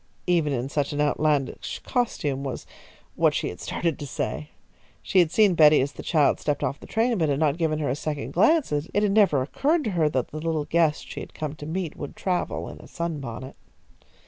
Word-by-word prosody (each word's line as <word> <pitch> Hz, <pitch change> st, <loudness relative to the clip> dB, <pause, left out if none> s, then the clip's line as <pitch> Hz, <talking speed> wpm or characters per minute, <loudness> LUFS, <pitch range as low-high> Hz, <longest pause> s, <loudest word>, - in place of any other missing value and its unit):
Even 170 Hz, -4 st, +2 dB
in 130 Hz, -1 st, -1 dB
such 140 Hz, 0 st, -1 dB
an 145 Hz, -, -3 dB
outlandish 150 Hz, -2 st, 0 dB
costume, 145 Hz, -, -1 dB
was 135 Hz, -2 st, -5 dB, 0.5 s
what -, -, +3 dB
she -, -, -1 dB
had -, -, -9 dB
started 170 Hz, -3 st, -2 dB
to 145 Hz, -, -5 dB
say. 75 Hz, -, -4 dB, 0.5 s
She 190 Hz, -, +3 dB
had 170 Hz, -3 st, +4 dB
seen 205 Hz, +2 st, +4 dB
Betty 155 Hz, -2 st, +6 dB
as 140 Hz, +2 st, 0 dB
the -, -, -9 dB
child 150 Hz, -4 st, +2 dB
stepped 145 Hz, -2 st, -1 dB
off 135 Hz, +3 st, -2 dB
the -, -, -12 dB
train, 230 Hz, -1 st, +1 dB
but 160 Hz, -2 st, +2 dB
had 140 Hz, -, +1 dB
not 155 Hz, +1 st, +1 dB
given 160 Hz, -2 st, +1 dB
her 150 Hz, -2 st, -1 dB
a 125 Hz, -, 0 dB
second 150 Hz, -1 st, -4 dB
glance, 305 Hz, -, +3 dB
as 150 Hz, +2 st, -1 dB
it 210 Hz, 0 st, +3 dB
never 195 Hz, -10 st, +4 dB
occurred 300 Hz, -, +1 dB
to 215 Hz, -, -1 dB
her 165 Hz, -4 st, +2 dB
that 130 Hz, -4 st, -1 dB
the 155 Hz, -, -6 dB
little 160 Hz, -2 st, -1 dB
guest 160 Hz, -2 st, +1 dB
she -, -, -7 dB
had -, -, -9 dB
come 155 Hz, -2 st, -4 dB
to 150 Hz, -1 st, -9 dB
meet 170 Hz, 0 st, -3 dB
would 145 Hz, -, -7 dB
travel 180 Hz, -2 st, -2 dB
in -, -, -9 dB
a -, -, -13 dB
sunbonnet. 140 Hz, -7 st, -5 dB
155 Hz, 220 wpm, -25 LUFS, 145-175 Hz, 0.5 s, Betty